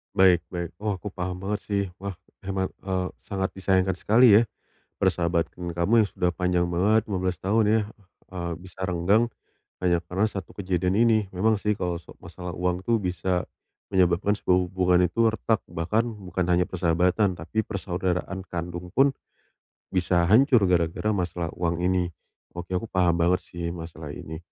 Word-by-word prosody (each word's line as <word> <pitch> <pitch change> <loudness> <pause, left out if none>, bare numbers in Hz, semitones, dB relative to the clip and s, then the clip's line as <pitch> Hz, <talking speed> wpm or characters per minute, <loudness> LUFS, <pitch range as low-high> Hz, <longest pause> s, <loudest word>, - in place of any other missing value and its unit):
Baik 90 -2 +5
baik. 85 -2 -5
Wah, 105 -1 -1
aku 100 +2 -7
paham 90 -1 -4
banget, 105 +1 -1
sih. 100 -1 +1 0.2
Wah, 100 -1 -5 0.2
hemat 95 0 -2
eee, 95 -1 -2
sangat 95 -1 -3
disayangkan 95 -1 +1
sekali 115 +2 +6
ya, 115 - +3 0.6
persahabatan 85 -2 0
kamu 85 +6 +1
yang - - -1
sudah 90 -3 -1
panjang 90 0 +1
banget, 105 +6 +3
15 95 -1 0
tahun 110 +4 +3
ya, 110 0 +4 0.5
eee, 85 -2 -4
bisa 95 +1 -14
renggang 95 +7 +2 0.6
hanya 85 -2 +3
karena 95 +5 -1
1 95 -5 -7
kejadian 90 -1 0
ini. 110 -2 +3
Memang 110 +3 +2
sih, 105 +1 0
kalau 90 -3 -2
so 85 - -15
masalah 85 0 -7
uang 90 +1 0
tuh 115 - +4
bisa 90 -1 -1 0.5
menyebabkan 95 +2 +3
sebuah 90 - +3
hubungan 90 0 +3
itu 100 +7 +2
retak. 110 0 0
Bahkan, 105 +8 0 0.2
bukan 90 0 -1
hanya 90 0 +3
persahabatan, 90 +2 +1
tapi 85 +7 -4
persaudaraan 95 -2 -2
kandung 85 +1 -5
pun, 135 +1 +5 0.8
bisa 90 -1 +2
hancur 120 -1 +5
gara-gara 85 +3 +1
masalah 85 -3 -2
uang 85 0 -1
ini. 90 -1 +1 0.4
Oke, 90 +1 -6
aku 115 - -4
paham 90 -2 +2
banget 90 +2 +2
sih, 85 -1 -5
masalah 80 -3 -8
ini. 80 +1 -7
90 Hz, 160 wpm, -26 LUFS, 85-100 Hz, 0.8 s, sekali